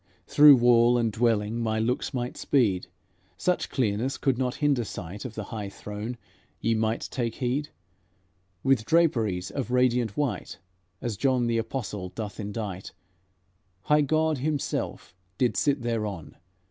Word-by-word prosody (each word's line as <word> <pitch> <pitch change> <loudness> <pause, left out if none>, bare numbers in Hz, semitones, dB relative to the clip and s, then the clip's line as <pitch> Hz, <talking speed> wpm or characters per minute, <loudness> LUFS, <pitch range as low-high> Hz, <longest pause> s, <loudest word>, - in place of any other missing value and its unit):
Through 145 -1 +8
wall 120 0 +5
and 115 -2 +1
dwelling 110 0 +1
my 110 -1 0
looks 115 +3 -1
might 125 -2 -3
speed, 100 -10 +1 0.5
Such 180 -1 0
clearness 120 +1 0
could 135 -2 +1
not 125 0 -1
hinder 145 -5 +1
sight. 100 0 -7
Of 120 -3 -6
the 110 - -4
high 105 -3 -4
throne 105 +4 -6 0.4
ye 115 - +1
might 110 +1 0
take 120 -3 -2
heed, 135 +3 -1 0.9
With 135 -4 +3
draperies 110 - +1
of 135 -4 -3
radiant 125 -3 +2
white, 145 -3 -2 0.5
As 115 -4 -2
John 130 +1 +2
the 115 -1 +1
Apostle 105 -5 -4
doth 105 +2 -6
endite; 100 -3 -5 0.9
High 150 0 +4
God 155 0 +1
Himself 145 -8 -3 0.2
did 125 - +1
sit 140 -4 +1
thereon. 105 -8 -3
120 Hz, 140 wpm, -27 LUFS, 110-135 Hz, 0.9 s, Through